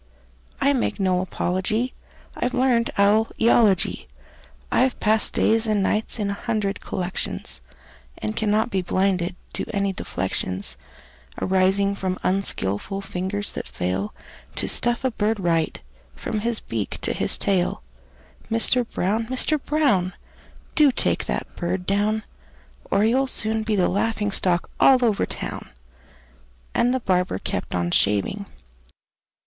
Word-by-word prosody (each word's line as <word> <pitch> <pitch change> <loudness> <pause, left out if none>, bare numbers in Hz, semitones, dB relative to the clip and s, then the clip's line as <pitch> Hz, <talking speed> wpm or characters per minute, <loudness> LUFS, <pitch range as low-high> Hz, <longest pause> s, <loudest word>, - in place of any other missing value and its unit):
I 280 +1 +3
make 250 -4 -1
no 185 -2 +2
apology; 190 +6 -1 0.4
I've 250 +1 -1
learned 250 -2 +2
owl 205 +2 +4
eology. 220 -5 +3 0.6
I've 260 0 +2
passed 215 0 +3
days 225 +1 +3
and 210 -2 +2
nights 215 +4 0
in 205 -2 -1
a - - -1
hundred 210 -2 -2
collections, 175 - -4 0.6
And 105 0 -3
cannot 220 +2 +1
be 190 - +1
blinded 185 0 0 0.2
to - - -2
any 200 -2 0
deflections 95 - -2 0.6
Arising 190 +2 +2
from 185 -2 -2
unskilful 190 - -1
fingers 195 +2 -3
that - - -6
fail 95 +3 -2 0.4
To - - +3
stuff 240 +1 +2
a 260 - +1
bird 220 -1 0
right, 165 -3 0 0.4
from 210 - -3
his 230 +1 -1
beak 110 -3 -3
to - - 0
his - - +2
tail. 185 - 0 0.7
Mister 230 +2 +4
Brown! 220 0 -1
Mister 275 +4 +1
Brown! 265 -12 +1 0.6
Do 300 -3 +5
take - - +1
that - - -3
bird 180 +1 -2
down, 210 +3 +1 0.7
Or 200 - +3
you'll 260 +4 +2
soon 220 -3 0
be 220 -1 0
the 185 -3 +3
laughing 205 +1 0
stock 180 -3 +1
all 255 -2 +6
over 215 -3 +1
town!" - - -5 1.0
And 245 - +3
the 260 0 0
barber 180 - +1
kept - - -3
on 85 -1 0
shaving. 105 - +2
200 Hz, 135 wpm, -23 LUFS, 185-225 Hz, 1.0 s, all